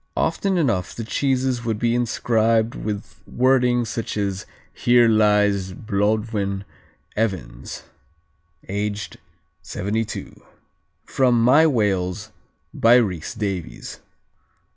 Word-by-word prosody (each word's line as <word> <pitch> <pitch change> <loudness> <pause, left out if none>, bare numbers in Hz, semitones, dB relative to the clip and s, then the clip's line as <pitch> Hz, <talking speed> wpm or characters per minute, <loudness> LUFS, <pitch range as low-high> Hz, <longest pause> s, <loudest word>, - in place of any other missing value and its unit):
Often 195 -2 0
enough 115 - 0
the 115 - -5
cheeses 130 0 0
would 115 -2 -1
be 115 +1 +1
inscribed 115 -1 +1
with 105 -2 -4
such 75 - -25
wording 125 -1 +2
as 105 -4 -3 0.3
'Here 120 -1 +4
lies 105 -3 +2
Blodwen 105 -1 -1 0.5
Evans, 95 - -3 0.8
aged 100 +1 -4 0.4
72.'" 110 +3 -4 0.6
(From 125 -3 +2
My 145 +7 +6
Wales 105 - -1 0.4
by 115 +1 +5
Rhys 100 -3 0
Davies.) 100 -6 -5
110 Hz, 95 wpm, -22 LUFS, 100-120 Hz, 0.8 s, My